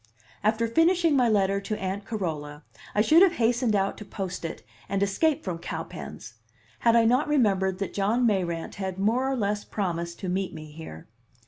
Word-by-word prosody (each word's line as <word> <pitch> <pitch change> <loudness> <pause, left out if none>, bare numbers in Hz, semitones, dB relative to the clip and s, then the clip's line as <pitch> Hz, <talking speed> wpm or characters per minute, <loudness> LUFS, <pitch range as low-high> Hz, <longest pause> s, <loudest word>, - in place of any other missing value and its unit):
After 220 +2 +2
finishing 330 +4 +3
my 250 -3 +4
letter 200 -2 +2
to 215 +1 -3
Aunt 195 +1 -3
Carola 155 -8 -4 0.3
I 210 - +4
should 310 +10 +6
have 380 -2 +6
hastened 235 -3 +1
out 195 0 0
to - - -7
post 190 -3 -5
it 165 - -5 0.3
and 195 +1 +1
escape 275 +10 +1
from 175 -3 -4
Cowpens, - - -7 0.5
had 230 -1 +4
I 230 -1 +5
not 250 +6 +3
remembered 195 -10 +2
that 195 - -4
John 215 +5 +1
Mayrant 175 -6 0
had 190 -1 -3
more 235 +7 +1
or 270 - 0
less 205 -3 -1
promised 170 -4 -3
to 190 - -3
meet 185 0 -2
me 155 -1 -9
here. 150 - -10
200 Hz, 185 wpm, -26 LUFS, 185-235 Hz, 0.5 s, should